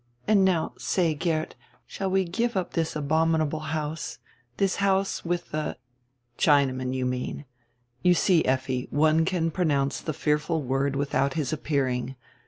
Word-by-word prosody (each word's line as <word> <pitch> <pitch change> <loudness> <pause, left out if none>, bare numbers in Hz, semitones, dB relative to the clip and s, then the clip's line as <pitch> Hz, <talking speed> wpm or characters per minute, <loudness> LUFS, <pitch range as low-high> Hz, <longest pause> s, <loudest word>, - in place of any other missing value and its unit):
And 205 -2 +5
now 180 -4 +1
say, 170 -4 +1
Geert, 155 0 -1 0.3
shall 195 -1 -3
we 190 0 +2
give 230 +6 -1
up 185 - -2
this 165 -1 -1
abominable 155 +1 +1
house, 155 0 -3 0.4
this 195 -1 +1
house 195 0 +1
with 175 0 -3
the 155 -4 -3 0.2
— 125 +1 -46
" 120 -1 -46
"Chinaman, 130 -4 +3
you 130 -1 -1
mean. 125 +3 -3 0.6
You 180 0 +4
see, 175 -2 +3
Effi, 130 -1 -1
one 155 +2 +3
can 165 -2 0
pronounce 145 -5 0
the 155 - -3
fearful 150 +2 0
word 135 +2 0
without 140 -1 0
his 155 -3 -1
appearing. 135 -4 -1
155 Hz, 155 wpm, -26 LUFS, 135-170 Hz, 0.6 s, And